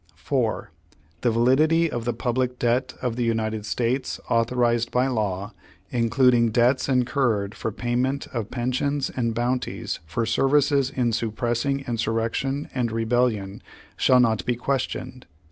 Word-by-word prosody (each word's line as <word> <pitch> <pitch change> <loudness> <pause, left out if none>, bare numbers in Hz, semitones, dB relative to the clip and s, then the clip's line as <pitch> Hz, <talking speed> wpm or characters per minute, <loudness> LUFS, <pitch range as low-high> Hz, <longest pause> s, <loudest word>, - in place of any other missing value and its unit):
4. 110 - -2 0.5
The 120 - +2
validity 145 +9 +3
of 120 -1 -4
the 120 - 0
public 125 0 -1
debt 125 +2 0
of 125 -2 -1
the 125 - 0
United 110 -2 -1
States, 125 +4 -1
authorized 120 0 +2
by 125 +1 +2
law, 105 -5 -2 0.4
including 120 0 +3
debts 125 +4 +2
incurred 120 -5 +1
for 110 - -4
payment 125 +5 -1
of 115 -4 -3
pensions 130 +3 -1
and 115 -3 -2
bounties 125 +2 -2
for 115 +8 -1
services 135 +3 +2
in 125 -4 0
suppressing 120 +5 -1
insur 115 -3 -2
rection 135 +5 -1
and 120 -3 -1
rebellion, 115 -3 0 0.3
shall 130 -1 +4
not 115 -3 +2
be 125 - 0
questioned. 130 -1 -3
120 Hz, 135 wpm, -24 LUFS, 115-130 Hz, 0.5 s, shall